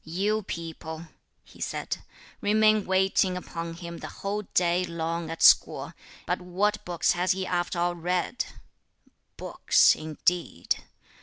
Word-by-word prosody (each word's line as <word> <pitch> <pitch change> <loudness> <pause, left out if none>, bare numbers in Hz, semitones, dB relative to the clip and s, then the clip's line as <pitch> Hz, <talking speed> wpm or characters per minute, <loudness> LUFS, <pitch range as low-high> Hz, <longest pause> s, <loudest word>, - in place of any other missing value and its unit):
"You 200 +7 0
people," 165 -2 -7 0.3
he - - -17
said, - - -3 0.4
"remain 215 0 +3
waiting 190 0 +2
upon 165 -2 -6
him 170 0 -8
the - - -6
whole 205 +1 -3
day 180 0 +3
long 170 -1 -3
at 165 - -3
school, - - +5 0.3
but 180 +2 -1
what 200 +4 0
books 175 -2 +1
has 180 +1 +2
he 190 0 -3
after 175 0 -1
all 175 +1 +1
read? 180 +6 -1 0.9
Books - - +4
indeed! 155 - -1
175 Hz, 130 wpm, -27 LUFS, 170-190 Hz, 0.9 s, school